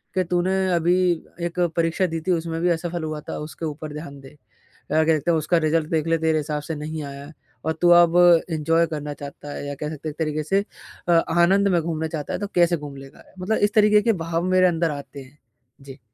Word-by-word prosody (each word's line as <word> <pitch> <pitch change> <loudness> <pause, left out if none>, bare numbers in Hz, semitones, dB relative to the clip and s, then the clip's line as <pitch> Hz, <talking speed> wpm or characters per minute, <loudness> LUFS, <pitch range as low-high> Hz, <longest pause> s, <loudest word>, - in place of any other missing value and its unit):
कि 185 - +2
तूने 180 +2 0 0.2
अभी 175 +1 +2 0.2
अ, 170 - -15
1 170 +1 -3 0.2
परीक्षा 165 +3 +1
दी 165 -1 -4
थी - - +3
उसमें 165 -1 -1
भी 175 - +2
असफल 170 0 -2
हुआ 155 -1 -4
था - - -4
उसके 155 +2 -7
ऊपर 155 0 -6
ध्यान 150 -2 -8
दे। 135 - -12
अ, - - -20 0.6
कह 160 +1 +3
सकते 170 - -1
हैं 165 - +3
उसका 155 +3 +1
रिज़ल्ट 155 0 +1
देख 160 -1 0
ले 165 0 +2
तेरे 160 -1 +1
हिसाब 150 0 -3
से 160 - -5
नहीं 155 +1 -5
आया 140 +2 -9 0.3
और 160 - +1
तू 175 - +5
अब 170 0 +2 0.3
एंजॉय 165 +1 +2
करना 150 -2 -5
चाहता 145 0 -9
है। - - -6
या 145 - -4
कह 150 - -3
सकते 155 0 -6
हैं - - -4
एक 145 - -24
तरीक़े 155 -1 -1
से 195 +6 0 0.4
अ, - - +4
आनंद 175 +4 +3
में 175 -3 +2
घूमना 160 -1 -2
चाहता 155 -3 -5
है, - - -2
तो 205 - -2
कैसे 175 -1 +3
घूम 145 -3 -8
लेगा? 135 0 -13
मतलब 195 +4 -1
इस 205 +1 +1
तरीक़े 210 -1 +5
के 230 - +3
भाव 165 +1 -1
मेरे 185 0 +5
अंदर 165 -2 +1
आते 140 -1 -8
हैं। 135 +3 -19 0.4
जी। 135 0 -11
160 Hz, 240 wpm, -23 LUFS, 150-175 Hz, 0.6 s, तू